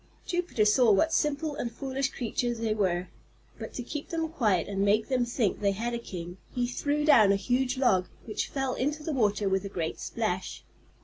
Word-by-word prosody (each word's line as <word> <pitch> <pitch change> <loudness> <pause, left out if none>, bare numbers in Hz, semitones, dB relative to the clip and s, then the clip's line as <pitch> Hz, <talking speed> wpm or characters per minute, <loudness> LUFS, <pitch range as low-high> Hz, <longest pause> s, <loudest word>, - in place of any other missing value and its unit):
Jupiter 350 - 0
saw 220 +2 +5
what 315 +12 +3
simple 300 0 0
and 240 -4 -3
foolish 270 +3 -2
creatures 240 0 -2
they 225 -1 0
were, 185 -4 0 0.5
but 220 - -6
to 245 - -4
keep 295 +4 -6
them 325 -1 -2
quiet 215 - +1
and 195 -1 -2
make 210 +4 +2
them 255 -2 +2
think 235 -4 0
they 200 -1 +2
had 235 +4 -3
a 235 - -2
king 175 -5 -7 0.2
he 245 -1 +1
threw 290 +4 -1
down 220 -10 +7
a - - +4
huge 250 +6 0
log, 190 -9 +3 0.2
which 215 - -2
fell 270 -2 -2
into 295 +3 -2
the 315 - -2
water 210 -5 +1
with 190 0 +1
a 200 - -5
great 170 -4 -3
splash. 200 -5 -3
235 Hz, 200 wpm, -28 LUFS, 200-270 Hz, 0.5 s, down